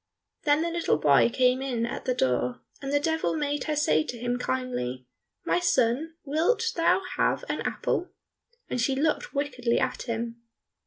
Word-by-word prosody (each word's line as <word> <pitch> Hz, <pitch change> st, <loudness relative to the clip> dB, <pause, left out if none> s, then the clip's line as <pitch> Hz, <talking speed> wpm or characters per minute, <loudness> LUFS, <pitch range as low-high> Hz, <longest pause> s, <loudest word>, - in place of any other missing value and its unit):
Then 295 Hz, +1 st, +4 dB
the 340 Hz, -, -1 dB
little 335 Hz, -, +1 dB
boy 145 Hz, +6 st, +5 dB
came 255 Hz, +1 st, +3 dB
in 245 Hz, -4 st, -1 dB
at 235 Hz, -, -5 dB
the 255 Hz, -, +1 dB
door, 125 Hz, -, 0 dB, 0.2 s
and 275 Hz, 0 st, -4 dB
the 290 Hz, -, +3 dB
Devil 320 Hz, +2 st, 0 dB
made 290 Hz, -2 st, -1 dB
her 305 Hz, -, -1 dB
say 155 Hz, -, +3 dB
to 245 Hz, -, -5 dB
him 245 Hz, +1 st, -2 dB
kindly, 125 Hz, -, -2 dB, 0.4 s
"My -, -, +2 dB
son, 300 Hz, 0 st, +1 dB
wilt 350 Hz, +11 st, +1 dB
thou 335 Hz, +3 st, +3 dB, 0.2 s
have -, -, +1 dB
an -, -, -2 dB
apple?" 360 Hz, -, -1 dB, 0.6 s
and 250 Hz, -, -1 dB
she 265 Hz, +3 st, +1 dB
looked 300 Hz, +2 st, 0 dB
wickedly 250 Hz, -4 st, 0 dB
at -, -, -1 dB
him. 230 Hz, 0 st, -3 dB
255 Hz, 170 wpm, -27 LUFS, 230-305 Hz, 0.6 s, boy